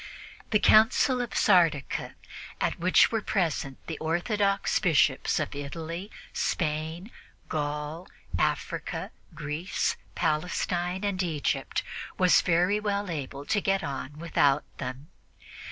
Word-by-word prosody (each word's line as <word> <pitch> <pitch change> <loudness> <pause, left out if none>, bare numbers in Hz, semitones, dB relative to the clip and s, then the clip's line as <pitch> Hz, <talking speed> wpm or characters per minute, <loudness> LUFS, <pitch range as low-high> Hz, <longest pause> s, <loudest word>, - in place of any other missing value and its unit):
The 215 - +4
Council 245 +5 +5
of 240 - -5
Sardica, 165 -8 +2 0.4
at - - -1
which 185 +2 +5
were 225 -1 0
present 160 -10 -1
the 160 - -5
orthodox 195 +5 +1
Bishops 155 -7 +2
of 155 - -2
Italy, 165 +6 -5 0.2
Spain, 160 +5 -2 0.4
Gaul, 150 +3 -3 0.3
Africa, - - -2 0.2
Greece, 155 +4 -2 0.2
Palestine 175 +3 -1
and 200 -2 0
Egypt, 160 -5 -1 0.3
was 185 -1 +5
very 180 +4 +2
well 205 -2 -1
able 140 -2 -5
to 205 +6 +1
get 195 0 +1
on 140 +1 -5
without 150 -3 +2 0.2
them. 130 +4 -6
170 Hz, 110 wpm, -28 LUFS, 150-195 Hz, 0.4 s, Council